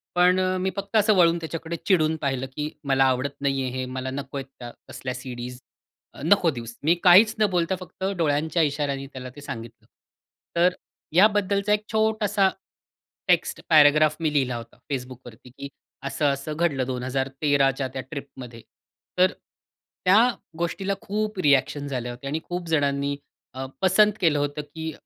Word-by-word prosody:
पण 180 +1 +4
अ, 185 0 +1
मी 185 +1 0
फक्त 200 +2 -6
असं 215 0 +4
वळून 170 -1 +5
त्याच्याकडे 165 0 -5
चिडून 160 -5 +3
पाहिलं, 135 -2 -1
की 150 0 -2 0.2
मला 135 0 +4
आवडत 130 +2 0
नाहीये 135 -2 0
हे. 130 +1 -3
मला 130 +1 -5
नको 140 +1 -5
आहेत 135 - -4
त्या 120 -1 -7 0.2
तसल्या 130 -1 -5
सीडीज. 125 -1 -7 0.5
अ, - - -12
नको 175 +1 +4
देऊस. 115 -3 -8
मी 165 +4 +4
काहीच 205 +5 +7
न 215 - +5
बोलता 180 +1 +1
फक्त 185 +1 -10
डोळ्यांच्या 160 +1 +1
इशाऱ्याने 140 -2 -1
त्याला 130 -2 -8
ते 145 - -11
सांगितलं. 115 -4 -8 0.7
तर 175 +2 +4 0.4
याबद्दलचा 200 +1 +3
एक 210 0 0
छोटासा 215 -3 +2 0.8
टेक्स्ट - - +1
पॅराग्राफ 155 -1 +6
मी 160 -2 0
लिहिला 130 -4 +1
होता 115 -1 -11
Facebookवरती, 125 -2 -7
की 140 +2 -9 0.4
असं-असं 140 +1 -1
घडलं 150 -5 0
2013 135 +2 0
च्या 135 0 -3
त्या 130 - -3
ट्रिप 140 +2 -8
मध्ये. 120 -2 -9 0.6
तर 185 +1 +5 0.7
त्या 185 +3 +6 0.4
गोष्टीला 190 +4 -2
खूप 210 0 -3
रिएक्शन्स 140 0 +2
आल्या 125 -1 -3
होत्या 125 +3 -7
आणि 155 +3 -1
खूप 175 -1 -5
जणांनी 140 -2 +1 0.4
अ, 130 +1 -5 0.2
पसंत 200 +3 +5
केलं 155 -4 +3
होतं, 145 +1 -2
की 160 +2 -7
145 Hz, 160 wpm, -24 LUFS, 130-180 Hz, 0.8 s, काहीच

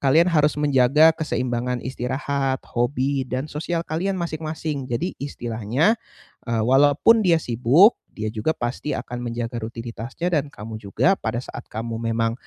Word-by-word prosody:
kalian 165 +6 +4
harus 150 -2 +3
menjaga 150 +2 +5
keseimbangan 125 -5 -2
istirahat, 130 +1 -2
hobi 130 +2 -1
dan 130 +3 -2
sosial 165 +3 -2
kalian 185 +5 -2
masing-masing. 155 -4 -4
Jadi 155 +10 -2
istilahnya, 125 - 0 0.5
eee, 115 -2 +1
walaupun 145 - +5
dia 175 -5 +4
sibuk, 135 - +4
dia 110 0 -4
juga 115 +8 0
pasti 120 +5 -3
akan 120 0 -6
menjaga 120 0 -3
rutinitasnya 115 +9 -5
dan 145 -1 +1
kamu 110 -4 -8
juga 105 - +2
pada 110 +1 -2
saat - - -8
kamu 115 +1 -4
memang 115 0 +1
130 Hz, 140 wpm, -23 LUFS, 120-155 Hz, 0.5 s, menjaga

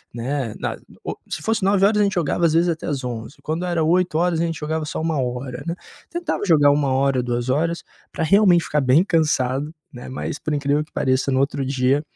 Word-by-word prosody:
né. 125 -1 -3
Na - - -3 0.3
o - - -3 0.2
se - - -4
fosse 220 +6 0
21h 200 +2 +3
a - - +5
gente 200 - 0
jogava, 170 0 +1
às 160 - +3
vezes 170 +2 +3
até 165 0 -3
às 140 -4 -2
23h, 120 +2 -5
quando 160 +3 -2
era 175 -2 0
20h 175 0 +2
a 170 - +1
gente 165 -2 -3
jogava 155 +1 -2
só 150 - -4
1h, 130 -5 -2
né. 170 - -1 0.3
Tentava 340 -7 -3
jogar 150 -6 +5
1h, 135 -2 +2
2h 130 +8 -1 0.3
pra - - -2
realmente 180 0 +5
ficar 150 - 0
bem 135 +6 +4
cansado, 150 -5 0 0.2
né, 125 -1 -10
mas, 130 +2 -5
por 155 - -3
incrível 145 +1 +1
que - - -32
pareça, 130 +1 +1
no 130 - +2
outro 140 0 -1
dia 135 +1 +1
150 Hz, 200 wpm, -22 LUFS, 130-170 Hz, 0.3 s, a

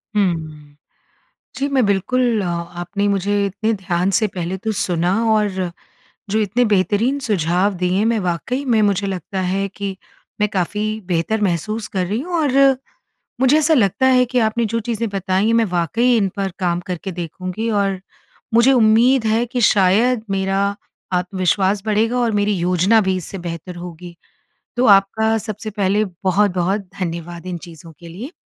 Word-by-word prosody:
हुँ। 155 -7 -2 0.8
जी, 280 +1 -1
मैं 265 -4 +2
बिल्कुल 225 +4 +1
अ, 185 - -3
आपने 175 +4 -3
मुझे 200 +1 +1
इतने 210 +3 -1
ध्यान 185 -2 -1
से 215 - +2
पहले 180 +1 -3
तो 220 +3 -3
सुना 175 0 0 0.2
और 210 -1 +2 0.8
जो 215 - +1
इतने 220 +3 +1
बेहतरीन 215 +5 +1
सुझाव 195 - 0
दिए, 180 +3 0
मैं 230 0 +2
वाक़ई 185 - -2
में 235 -5 +2
मुझे 200 -1 +1
लगता 190 0 -4
है 190 +2 -1
कि 195 0 -5 0.4
मैं 210 - +3
काफ़ी 210 +3 -2
बेहतर 180 +5 0
महसूस 205 +4 -1
कर 185 - +1
रही 210 +6 -2
हूँ। 350 +4 -6
और 275 -2 +4 0.7
मुझे 265 +3 +5
ऐसा 310 +1 +3
लगता 235 - +2
है 255 -1 +5
कि 250 +1 0
आपने 230 +2 0
जो 230 +2 -1
चीज़ें 230 0 -2
बताईं, 195 +2 0
मैं 230 0 +3
वाक़ई 210 +7 +1
इन 200 -3 +2
पर 195 -1 -1
काम 175 -1 0
करके 185 +1 -4
देखूँगी 185 +6 -4
और 200 -3 0 0.5
मुझे 235 +4 +5
उम्मीद 235 +2 +4
है 225 +2 +2
कि 245 +1 -3
शायद 215 +4 +3
मेरा 195 +1 0 0.4
आत्मविश्वास 185 +2 +1
बढ़ेगा 220 +3 +1
और 240 -2 +1
मेरी 205 +1 +1
योजना 180 +5 +3
भी 190 -2 0
इससे 185 +2 -6
बेहतर 175 +1 -6
होगी। 175 0 -9 0.6
तो 245 +1 +2
आपका 220 +3 +4
सबसे 215 0 -6
पहले 205 0 +1 0.2
बहुत-बहुत 190 0 +1 0.2
धन्यवाद 170 0 -5
इन 180 - -4
चीज़ों 165 0 -12
के 170 - -12
लिए। 205 - -8
200 Hz, 160 wpm, -19 LUFS, 180-225 Hz, 0.8 s, मुझे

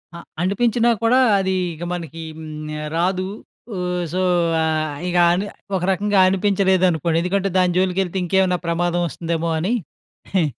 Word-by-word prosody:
అ - - -6 0.2
అనిపించినా 230 +5 +2
కూడా 240 +3 +4 0.2
అది 190 0 0 0.2
ఇగ 165 +2 -8
మనకి 165 -2 -6 0.2
హ్మ్. 155 -1 -7 0.3
రాదు. 185 +2 0 0.5
ఓహ్! 180 0 -2
సో, 185 - 0 0.4
ఆ! - - +2 0.4
ఇక 175 0 0
అని 190 +4 0 0.3
ఒక 180 - -1
రకంగా 200 +1 +1
అనిపించలేదనుకోండి 185 -4 +2
ఎందుకంటే, 195 +2 0
దాని 180 -1 +2
జోలికి 185 0 +1
వెళ్తే 185 +1 -5
ఇంకేమన్నా 180 0 +2
ప్రమాదం 175 +1 0
వస్తుందేమో 165 0 -3
అని. 195 +9 0 0.6
హె... 175 -4 +4
180 Hz, 140 wpm, -21 LUFS, 170-190 Hz, 0.6 s, కూడా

